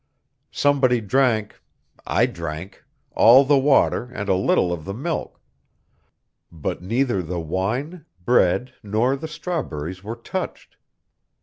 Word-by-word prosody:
Somebody 135 -4 +2
drank 110 -1 0 0.5
I - - +3
drank 85 - -7 0.3
all 130 +5 +7
the 140 0 +4
water 135 -2 +3
and 115 -5 -6
a - - +4
little 90 -1 +2
of 80 -3 -6
the 100 +3 -6
milk, 160 +7 -4 1.1
but 80 -1 -4
neither 115 +2 0
the 85 +1 -4
wine, 110 - -3 0.2
bread 125 +2 +2
nor 110 +6 +1
the 160 +4 -6
strawberries 100 - -5
were 110 +3 -5
touched. - - -6
115 Hz, 120 wpm, -22 LUFS, 95-135 Hz, 1.1 s, all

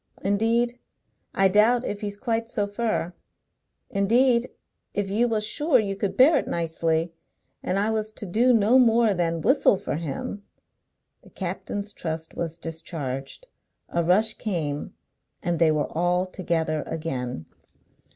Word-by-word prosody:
Indeed, 230 +4 +1 0.6
I 195 - +5
doubt 220 +6 +4
if 205 - -4
he's 205 -1 -4
quite 230 0 -1
so 210 -3 -1
fur. 205 -4 -2 0.8
Indeed, 235 +5 +3 0.5
if 200 -1 -1
you 230 +4 +2
was 215 -2 -1
sure 295 +5 +2
you 200 -4 -1
could 200 0 -3
bear 290 +4 +7
it - - -2
nicely, 165 0 -1 0.5
and 185 - -1
I 210 +3 +1
was 215 -1 -2
to 210 - -7
do 230 +7 +3
no 230 +2 +5
more 230 -3 +4
than 165 -2 -1
whistle 265 - +4
for 150 - -3
him 165 +5 -5 0.4
" - - -53
The - - -17
captain's 205 0 -5
trust 160 -2 -5
was 165 -1 -4
discharged. 160 - -6 0.4
A 170 - 0
rush 210 +6 +3
came, 160 -10 -3 0.5
and 175 -1 -1
they 165 -2 +5
were 150 -1 -1
all 175 +2 +2
together 165 -4 -1
again. 125 - -4
200 Hz, 145 wpm, -25 LUFS, 165-225 Hz, 0.8 s, bear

